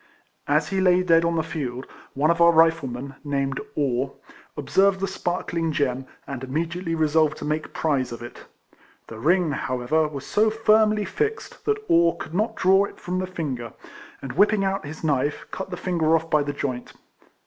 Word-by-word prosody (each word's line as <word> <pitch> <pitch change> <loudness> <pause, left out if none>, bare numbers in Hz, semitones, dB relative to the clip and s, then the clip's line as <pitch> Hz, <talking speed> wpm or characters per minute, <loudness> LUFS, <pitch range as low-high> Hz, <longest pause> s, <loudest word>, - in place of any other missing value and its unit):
As 150 +1 +2
he 195 -1 0
lay 180 -1 +4
dead 165 -2 +4
on 170 0 +1
the 160 - +1
field, 135 -6 -5 0.3
one 150 +4 +3
of 170 0 0
our 170 0 +8
Riflemen, 140 -5 +1
named 140 -2 -1
Orr, 135 -2 0 0.4
observed 190 +7 +2
the 195 - -1
sparkling 170 -3 -2
gem, 135 -3 -1 0.2
and 135 -2 -6
immediately 165 +5 -2
resolved 155 -1 +2
to - - -6
make 155 +1 -2
prize 135 -6 0
of 120 0 -7
it. 120 - -10 0.6
The 110 - -10
ring, 175 +4 +2
however, 140 +3 0
was 140 -2 -7
so 220 +1 +2
firmly 215 -1 +3
fixed 435 - -3
that 430 0 +2
Orr 170 - +4
could - - -8
not 220 +4 0
draw 190 +2 +4
it - - -12
from 180 +1 -3
the 185 - -2
finger, 135 -10 -5 0.5
and 135 - -5
whipping 205 +4 +3
out 195 -5 -2
his 155 +2 -9
knife 145 -1 0
cut 190 - -5
the 180 - -5
finger 165 -3 +1
off 165 0 -2
by 150 - +4
the 145 0 -2
joint. 130 -3 -4
160 Hz, 180 wpm, -24 LUFS, 140-185 Hz, 0.6 s, our